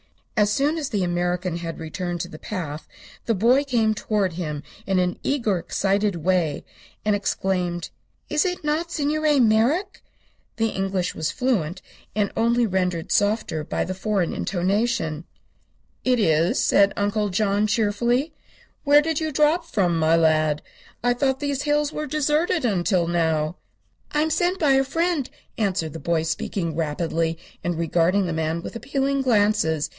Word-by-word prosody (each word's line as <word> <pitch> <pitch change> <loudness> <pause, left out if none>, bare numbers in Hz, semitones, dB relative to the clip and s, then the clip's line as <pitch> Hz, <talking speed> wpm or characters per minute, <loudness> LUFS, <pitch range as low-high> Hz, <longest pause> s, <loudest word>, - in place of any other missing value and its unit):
As 210 -2 +3
soon 290 +8 +1
as 285 -3 -3
the 205 -6 0
American 175 0 -1
had 165 -1 -5
returned 175 +2 -4
to - - -4
the 155 - -11
path 160 -7 -5 0.4
the 230 - +2
boy 240 +8 +4
came 230 -6 +1
toward 210 -3 -1
him 150 -4 -4 0.2
in 195 -1 +1
an 180 -1 0
eager, 230 -10 0
excited 200 +3 0
way, 170 -2 0 0.4
and 210 -1 +3
exclaimed: 180 -3 -1 0.4
"Is 300 - +2
it 360 -3 -2
not 310 +3 -1
Signor 300 -1 +1
Merrick?" 245 - +2 0.5
The 225 0 +1
English 190 -2 -1
was 155 -1 -2
fluent, 190 -9 -1 0.3
and 205 -2 +1
only 235 +1 +2
rendered 180 -4 -1
softer 205 -6 +1
by - - -2
the 185 - -3
foreign 190 -2 -1
intonation. 185 -3 -1 0.8
"It 255 -1 +3
is," 165 -4 +2
said 200 0 +4
Uncle 205 +1 0
John, 205 +2 +1
cheerfully. 235 +7 +1 0.5
"Where 290 0 +6
did 320 -1 -1
you 315 -1 -2
drop 300 +4 +3
from, 185 - 0
my 160 +1 +4
lad? 155 -2 +2 0.4
I 245 0 +3
thought 265 +1 0
these 285 -2 -1
hills 295 0 +1
were 305 0 -3
deserted, 305 +2 +1
until 185 -4 +1
now." 160 -1 0 0.5
"I 300 - +1
am 315 +1 0
sent 355 +3 +1
by 300 -6 +3
a 270 0 +4
friend," 330 0 -1 0.3
answered 185 -7 -1
the 165 - -6
boy, 165 -1 0
speaking 165 0 -2
rapidly 165 +1 -1 0.3
and 175 -2 -1
regarding 170 +4 +2
the 170 - -2
man 160 +1 -2
with - - -7
appealing 275 +3 -1
glances. 205 - +2
205 Hz, 155 wpm, -23 LUFS, 170-270 Hz, 0.8 s, Where